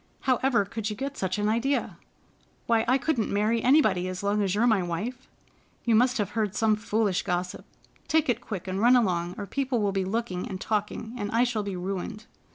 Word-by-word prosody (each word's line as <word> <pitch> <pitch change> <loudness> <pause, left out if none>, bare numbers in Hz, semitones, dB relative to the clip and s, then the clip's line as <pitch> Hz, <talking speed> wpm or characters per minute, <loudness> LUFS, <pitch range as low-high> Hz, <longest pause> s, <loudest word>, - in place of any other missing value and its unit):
How 255 -2 +2
ever 250 -6 +2
could 215 +1 -4
you 210 - -4
get 275 +4 -4
such 185 -4 -2
an 205 0 0
idea? 235 +6 0 0.7
Why, 225 -1 +2
I 255 +2 +4
couldn't 270 -6 0
marry 215 +3 +1
anybody 220 -10 +3
as 185 +1 -5
long 205 +1 +1
as 195 -1 0
you 210 - +1
are - - +4
my 220 -5 +3
wife. 210 +10 -4 0.6
You 235 - +3
must 250 +4 +4
have 210 -2 -1
heard 210 -2 -1
some 220 -1 +3
foolish 210 -3 0
gossip. 180 -1 -3 0.4
Take 320 -1 +2
it 245 -2 0
quick 195 -6 -6
and 190 +1 -2
run 245 +2 +6
along, 180 -7 +1
or 205 - -4
people 260 +2 -1
will 205 -2 +1
be 195 -1 0
looking 190 -2 -2
and 185 - -5
talking, 215 +2 -2
and 205 -1 -2
I 230 +3 +3
shall 240 -3 0
be 200 -2 -4
ruined." 195 +4 -4
215 Hz, 215 wpm, -27 LUFS, 195-240 Hz, 0.7 s, run